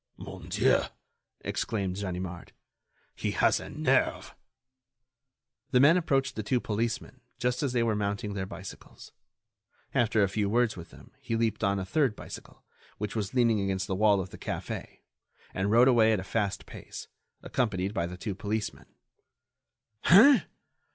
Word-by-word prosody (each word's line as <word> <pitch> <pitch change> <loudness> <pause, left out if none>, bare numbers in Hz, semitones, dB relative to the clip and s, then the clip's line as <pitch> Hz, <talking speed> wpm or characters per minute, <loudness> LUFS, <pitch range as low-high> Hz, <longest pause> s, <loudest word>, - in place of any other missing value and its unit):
"Mon - - -9
Dieu!" - - +3 0.6
exclaimed 95 -4 -2
Ganimard, 90 -3 -5 0.6
"he - - -2
has - - +3
a - - -8
nerve." - - 0 1.4
The 125 - +3
man 145 +6 +7
approached 135 -7 +1
the 110 - -2
two 125 +4 +1
policemen 115 +1 -3 0.2
just 125 0 -1
as 140 -4 0
they 120 -2 +2
were 115 -2 +1
mounting 100 0 -2
their 95 -1 -3
bicycles. 95 0 -10 0.8
After 110 -2 +3
a - - +3
few 100 +1 -1
words 120 +1 +2
with 85 -2 -10
them - - -16
he 115 - -3
leaped 115 -1 0
on 100 -1 +2
a 95 - -3
third 130 +2 +1
bicycle, - - -11 0.3
which 105 0 -4
was 105 +1 -3
leaning 115 -4 +3
against 95 -1 -1
the 95 - -3
wall 100 +1 +4
of 95 -1 -5
the - - -11
café, - - -6 0.5
and 95 +2 -1
rode 120 +4 +6
away 115 -3 +5
at 105 - +1
a - - -5
fast 100 -1 -2
pace, - - -9 0.4
accompanied 100 -5 -1
by 85 -5 -1
the 90 +1 -8
two 100 +2 -4
policemen. 105 +2 -4 1.2
"Hein! 260 +11 +7
105 Hz, 160 wpm, -29 LUFS, 95-120 Hz, 1.4 s, man